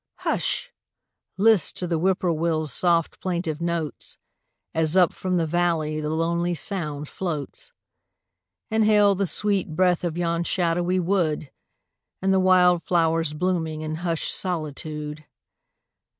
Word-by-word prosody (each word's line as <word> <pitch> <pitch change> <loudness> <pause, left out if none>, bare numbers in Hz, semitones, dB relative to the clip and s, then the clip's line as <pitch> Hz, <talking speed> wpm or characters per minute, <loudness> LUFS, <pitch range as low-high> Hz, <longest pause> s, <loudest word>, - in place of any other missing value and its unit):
Hush! - - 0 0.7
list 205 -4 +3
to 180 - -2
the 165 -2 -1
Whip 185 +2 +1
poor 180 - +1
will's 155 -3 0
soft 170 -2 +2
plaintive 170 -4 -3
notes, 170 -3 -2 0.6
As 160 +2 +2
up 180 -3 +5
from 185 -1 -2
the 165 - +1
valley 160 -2 0
the 150 - -3
lonely 170 +2 0
sound 155 -6 -3
floats, 170 - -4 1.0
Inhale 210 -2 +4
the 195 0 -1
sweet 195 -5 0
breath 180 0 +2
of 170 -1 -2
yon 170 -1 0
shadowy 175 +1 0
wood 170 -6 0 0.7
And 190 0 +1
the 190 - +4
wild 180 -2 +4
flowers 165 -3 +1
blooming 160 -2 -1
in 155 0 -4
hushed 165 -1 0
solitude. 155 -3 -3
170 Hz, 130 wpm, -24 LUFS, 155-185 Hz, 1.0 s, up